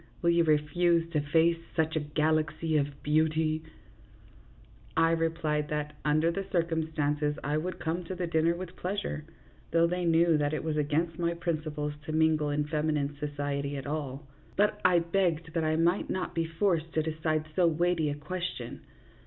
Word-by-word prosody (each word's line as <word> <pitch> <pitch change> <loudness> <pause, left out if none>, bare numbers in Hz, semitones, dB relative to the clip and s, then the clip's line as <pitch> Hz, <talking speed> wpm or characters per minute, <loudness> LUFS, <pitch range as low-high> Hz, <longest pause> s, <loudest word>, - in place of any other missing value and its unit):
Will 170 - +5
you 170 0 +4
refuse 165 +2 +2
to 150 -3 +1
face 165 +3 +3 0.2
such 160 -1 +1
a - - +2
galaxy 155 +1 0
of 140 -1 -1
beauty? 155 +1 +2 0.7
" 110 +4 -22
I - - +2
replied 160 -2 0
that, 150 0 -3
under 155 +3 +3
the 195 +3 -3
circumstances, 155 -3 0
I 145 +2 0
would 180 +4 -3
come 165 +3 -2
to 185 - -5
the 180 0 -2
dinner 165 0 +2
with 180 0 -7
pleasure, 185 -5 -3 0.4
though 165 0 +4
they 180 +1 -1
knew 165 -1 +4
that 145 +1 0
it - - -3
was 160 -1 -1
against 155 +3 0
my 170 0 0
principles 155 -3 -2
to 155 - -4
mingle 155 -1 +3
in 145 0 0
femi 155 0 0
nine 145 0 -1
society 145 -1 -2
at 135 - -6
all, 145 -1 -4 0.3
but 205 +1 +2
I 180 -1 +5
begged 170 -2 0
that 165 -2 0
I 155 0 +1
might 170 +4 +2
not 185 - -2
be 165 -1 0
forced 165 -1 0
to 155 - +1
decide 155 0 -1
so 180 -2 +4
weighty 165 -1 +1
a 145 - -2
question. 150 -5 -5
160 Hz, 175 wpm, -29 LUFS, 150-170 Hz, 0.7 s, Will